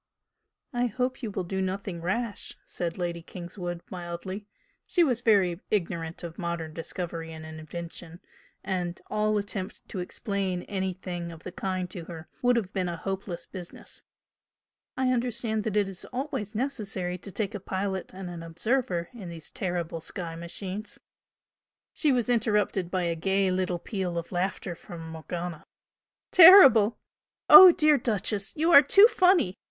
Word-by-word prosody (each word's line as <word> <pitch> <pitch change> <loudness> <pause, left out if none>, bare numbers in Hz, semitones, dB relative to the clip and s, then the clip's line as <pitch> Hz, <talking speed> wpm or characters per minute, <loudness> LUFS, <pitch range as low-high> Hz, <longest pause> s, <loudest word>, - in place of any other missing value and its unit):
"I 245 0 +1
hope 250 +4 -2
you 230 - -3
will 195 -2 -3
do 190 +2 -3
nothing 190 -2 -3
rash!" 205 +5 -3
said 170 -1 -4
Lady 175 -2 -3
Kingswood, 175 0 -7
mildly; 185 +3 -6 0.4
she 350 - +3
was 250 -6 +1
very 195 -7 +3
ignorant 170 -5 -2
of 170 +1 -7
modern 170 -3 -3
discovery 165 0 -5
and 160 0 -9
invention, 165 +2 -8 0.4
and 180 -2 -3
all 215 0 +1
attempt 200 -1 -5
to 190 - -5
explain 190 0 -3
anything 185 -3 -4
of 165 -1 -12
the 185 - -6
kind 185 0 -3
to 170 -3 -7
her 165 -2 -9
would 245 0 +4
have 215 -4 -2
been 185 -3 -1
a 170 - -4
hope 195 +3 -4
less 175 -3 -5
business 180 -3 -8 1.0
"I 260 -1 +2
understand 235 -3 -1
that 210 -2 -1
it 205 -2 +2
is 190 -1 -6
always 255 -5 -4
necessary 195 -8 -2
to 200 - -9
take 200 +1 -3
a 205 - -4
pilot 190 0 -3
and 190 0 -8
an 175 -1 -7
observer 170 +1 -1
in 205 -7 -8
these 165 -2 -9
terrible 175 -6 -3
sky 170 -1 -5
machines 185 +5 -5 0.5
" - - -67
She 300 - +2
was 245 -3 +1
interrupted 210 -6 +1
by 185 -1 -1
a 170 -1 0
gay 190 +3 +1
little 185 -1 0
peal 180 -1 -4
of 170 - -5
laughter 180 0 -2
from 165 -1 -10
Morgana. 165 +1 -6 0.7
"Terrible? 275 - +9 0.5
Oh, 375 -2 +12
dear 305 -3 +4
'Duchess,' 210 -2 -1
you 325 +3 +2
are 280 - +11
too 395 +8 +7
funny! 360 - +3
190 Hz, 160 wpm, -27 LUFS, 175-215 Hz, 1.0 s, Oh